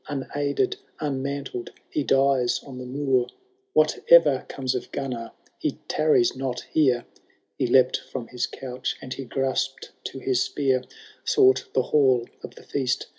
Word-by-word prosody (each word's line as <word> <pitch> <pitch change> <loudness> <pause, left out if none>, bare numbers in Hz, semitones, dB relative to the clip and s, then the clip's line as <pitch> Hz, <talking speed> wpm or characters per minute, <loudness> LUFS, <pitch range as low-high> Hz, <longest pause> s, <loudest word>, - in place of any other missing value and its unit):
Unaided, 145 - -1 0.2
unmantled, 140 -3 -3 0.2
he 150 - 0
dies 135 -2 +3
on 130 -3 -9
the 125 - -7
moor! 130 -2 +1 0.5
Whatever - - +5
comes 130 -1 -2
of 125 - -4
Gunnar, 125 -4 -4 0.3
he - - 0
tarries 155 -6 +3
not 130 -2 -3
here." 130 -6 +3 0.5
He - - +2
leapt 130 +1 +5
from 125 -3 -5
his 125 -1 -2
couch 125 -1 -4
and 130 -1 -6
he 135 - -6
graspM 135 0 -1 0.2
to - - -5
his 130 -2 +1
spear; 135 -2 +1 0.4
Sought 130 0 +4
the 130 - +3
hall 130 -5 +4
of - - -9
the - - -14
feast. 130 -3 -1
130 Hz, 145 wpm, -25 LUFS, 125-140 Hz, 0.5 s, Whatever